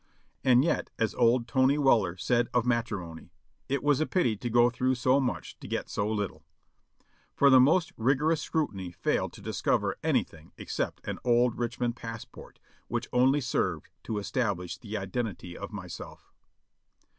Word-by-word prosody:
And 130 +1 +5
yet, - - 0
as 110 - 0
old 120 0 +3
Tony 130 +3 +3
Weller 110 - +3
said 120 +4 +1
of 120 -1 +3
matrimony, 100 -9 -2 0.4
"it 140 -1 -1
was 145 0 +3
a 155 - +1
pity 125 - +1
to 120 +4 -4
go 120 +1 +4
through 130 +1 0
so 130 +2 +3
much 130 -2 -3
to - - -9
get - - -3
so 105 +1 -1
little 105 -3 -3 0.5
;" - - -39
for 140 -1 +6
the 130 - +8
most 165 +8 +3
rigorous 150 +7 +2
scrutiny 100 - -2
failed 85 0 -1
to - - -12
discover - - 0
anything 80 0 -1
except - - -4
an - - -3
old 120 -1 +2
Richmond 120 0 -2
passport, 115 -2 -9 0.3
which - - -3
only 130 +4 +4
served 125 - -1
to 110 - -3
establish 100 -5 -2
the 110 -2 -6
identity 95 -2 -4
of 100 - -7
myself. 90 -5 -9
120 Hz, 160 wpm, -29 LUFS, 105-130 Hz, 0.5 s, the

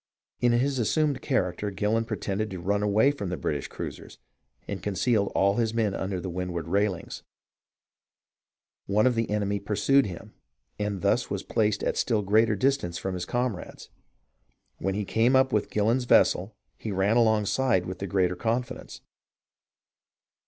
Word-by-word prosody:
In 120 - +3
his 130 +2 +1
assumed 140 +3 +1
character 100 -6 -1
Gillon 105 +3 0
pretended 110 -1 -3
to 95 - -6
run 100 +4 0
away 105 +6 +3
from 100 -10 -5
the 90 - -3
British 70 0 -2
cruisers, - - -8 0.5
and 100 -3 -5
concealed 100 +1 0
all 100 +2 +3
his 115 -1 0
men 110 -4 +1
under 95 -1 -3
the 95 - -5
windward 90 -2 -4
railings. 100 -1 -1 1.7
One 105 +3 +2
of 130 - +4
the 115 -1 -1
enemy 100 -1 0
pursued 110 +6 +2
him 90 -3 -9 0.5
and 105 -3 -3
thus - - +1
was - - -3
placed 105 -2 0
at - - +1
a - - -9
still 110 -4 +1
greater 105 +2 +3
distance 100 -6 0
from 95 - -3
his 90 -1 -4
comrades. 120 -5 -3 0.9
When 95 +1 -1
he 105 0 -2
came 115 +6 +2
up 130 0 +3
with 105 -1 +1
Gillon's 115 +4 +1
vessel, 100 -3 +3 0.3
he 110 - -4
ran 100 +3 +1
alongside 110 -2 +2
with 95 0 -6
the 100 - -4
greatest 90 -1 0
confidence. 120 +2 -3
105 Hz, 160 wpm, -27 LUFS, 95-115 Hz, 1.7 s, of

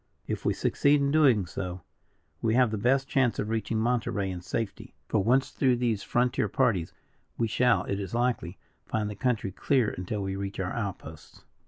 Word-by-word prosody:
If - - -4
we - - +2
succeed 145 +1 +3
in 140 0 +1
doing 135 - +4
so, 90 +1 -5 0.6
we 115 0 +2
have 125 -3 +4
the 110 - -1
best 135 +5 +2
chance 130 -4 +2
of 105 - -2
reaching 110 0 -1
Monterey 110 -4 0
in 90 -1 -6
safety. 100 +3 -4
For, - - +1
once 130 +4 +2
through 130 -3 +2
these 120 -4 0
frontier 125 +4 +1
parties, 105 -11 +1 0.5
we 115 - +1
shall, 125 +2 +3
it 100 - -3
is 100 +3 -4
likely, 120 -7 -1 0.3
find 105 -1 -1
the - - -7
country 115 -4 -1
clear 125 +3 +1
until 100 +3 -4
we 95 0 -3
reach 100 0 -5
our 90 -1 -2
outposts." 90 -9 -6
110 Hz, 185 wpm, -28 LUFS, 95-125 Hz, 0.6 s, doing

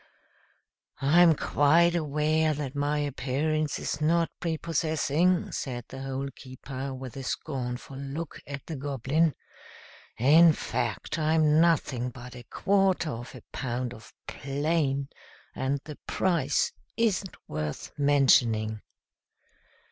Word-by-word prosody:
"I'm 165 +4 +6
quite 165 +5 +3
aware 155 0 +1
that 140 -3 -4
my 145 +1 0
appearance 145 +2 -1
is 145 - -3
not 165 +2 +2
prepossessing," 165 +1 0
said 120 -3 -4
the 135 - -8
Hole 135 +1 -3
keeper, 130 +1 -7
with 130 -2 -7
a 135 - -5
scornful 130 -1 -4
look 140 +4 -6
at 140 0 -7
the 160 - -5
Goblin. 140 +3 0 0.8
"In 155 +7 +7
fact, 155 - -3
I'm 155 0 +3
nothing 140 -7 +2
but 125 0 -10
a 120 -1 -10
quarter 195 -5 +2
of 120 +1 -7
a - - -11
pound 125 -1 -3
of 110 - -13 0.2
'plain,' 140 -1 -1 0.4
and 135 +2 -1
the 150 -2 -9
price 165 -7 +1 0.3
isn't 205 -4 0
worth 75 -1 -4
mentioning." 120 -7 +3
145 Hz, 115 wpm, -28 LUFS, 130-160 Hz, 0.8 s, In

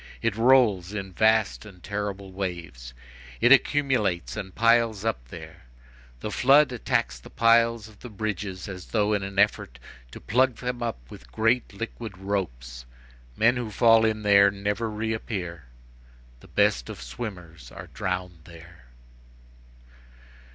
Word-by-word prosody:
It 115 -3 0
rolls 115 -6 +3
in 95 -2 -5
vast 110 +2 +2
and 95 -5 -14
terrible 100 -1 -5
waves; 85 -11 -6 0.4
it 120 - +4
accumulates 130 - +2
and 95 -4 -7
piles 115 -2 +2
up - - -2
there; 80 -2 -12 0.6
the 105 - -4
flood 140 +4 +4
attacks 65 - -1
the - - -14
piles 115 -1 +3
of 105 -2 -18
the 125 - -10
bridges 105 -3 -5
as 95 -2 -8
though 105 -1 +1
in 100 - 0
an 95 0 -7
effort 100 -11 +1 0.3
to - - -11
pluck 125 +3 +1
them 125 0 -5
up 110 - -5
with 60 - -13
great 115 - +1
liquid 110 -1 -7
ropes. 60 -12 -5 0.5
Men 120 +3 +3
who 120 -3 -4
fall 115 +1 +4
in 110 -1 0
there 100 -1 +6
never 100 +3 -3
reappear; 105 - -4 0.7
the - - -17
best - - +1
of - - -8
swimmers 85 - -8
are - - -9
drowned 90 -2 -4
there. 85 -3 -15
100 Hz, 140 wpm, -25 LUFS, 90-115 Hz, 0.7 s, there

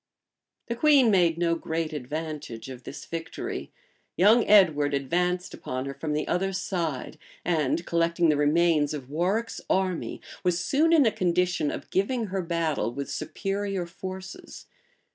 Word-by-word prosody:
The 235 - -3
queen 270 -3 +5
made 175 -4 +3
no 170 -1 +2
great 160 -1 -2
advantage 150 -4 -5
of 125 -1 -10
this - - -8
victory: 165 0 -5 0.5
young 215 +6 +6
Edward 155 -9 +5
advanced 180 +6 -1
upon 130 +1 -4
her 140 - -4
from 150 +2 -4
the 150 - -1
other 195 +2 0
side; 165 -6 -3 0.3
and 165 0 +1
collecting 170 0 +2
the 150 - +4
remains 150 0 +3
of 135 -2 -8
Warwick's 190 +9 -1
army, 185 -2 0 0.2
was 180 -1 +2
soon 290 - +2
in 315 -5 +6
a 225 - +4
condition 180 -4 +1
of - - -6
giving 225 +5 0
her 190 - 0
battle 165 -7 -1
with 140 +3 -5
superior 195 -2 -3
forces. 185 +2 -8
170 Hz, 145 wpm, -27 LUFS, 150-190 Hz, 0.5 s, young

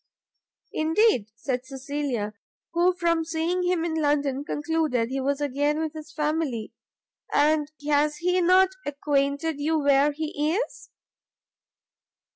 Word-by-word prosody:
"Indeed?" 320 - +2
said 250 +2 -3
Cecilia, 270 -5 -3 0.4
who, 350 +2 +3
from 335 -2 +1
seeing 330 +2 -1
him 355 -2 +1
in 335 - -2
London 290 -3 +1
concluded 295 -6 0
he 270 - -1
was 280 +1 0
again 290 +1 0
with 315 -1 -2
his 310 -1 -9
family, 300 -7 -2 0.6
"and 300 0 +2 0.2
has 295 0 +2
he 360 +1 +1
not 370 +2 +5
acquainted 285 +1 -1
you 315 +2 +1
where 285 0 +4
he 305 +1 -2
is?" 470 - -4
300 Hz, 120 wpm, -26 LUFS, 280-325 Hz, 0.6 s, not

